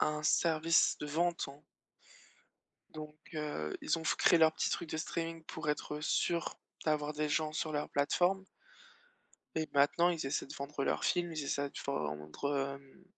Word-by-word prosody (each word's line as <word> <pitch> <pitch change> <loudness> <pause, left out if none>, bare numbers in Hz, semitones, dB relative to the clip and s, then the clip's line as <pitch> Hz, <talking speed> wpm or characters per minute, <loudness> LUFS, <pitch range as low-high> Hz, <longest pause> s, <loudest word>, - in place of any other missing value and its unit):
un 150 0 +1
service 165 +1 +4
de 150 - -4
vente, 170 +3 0
hein. 140 +1 -11 1.3
Donc 155 -1 -8 0.2
heu, 150 - -2
ils 165 - +1
ont - - -7
f - - +2
créé 170 - +5
leur 160 0 +7
petit - - 0
truc 170 - -2
de 160 - -2
streaming 165 0 -3
pour 150 - -4
être 150 0 -2
sûr 170 +2 +1 0.3
d'avoir 150 -1 +1
des 150 0 -1
gens 155 +1 +1
sur 155 0 -1
leur 150 0 -2
plateforme. 180 +7 +2 1.1
Et 160 -1 0
maintenant, 145 +5 +4
ils 170 -3 -1
essaient 135 - -1
de - - -8
vendre 140 0 -3
leurs - - 0
films, 175 -2 +1
ils 155 -2 -3
essaient 140 0 -1
de - - -25
vendre, 135 - -2
hem 140 +6 -17
150 Hz, 175 wpm, -34 LUFS, 140-165 Hz, 1.3 s, leur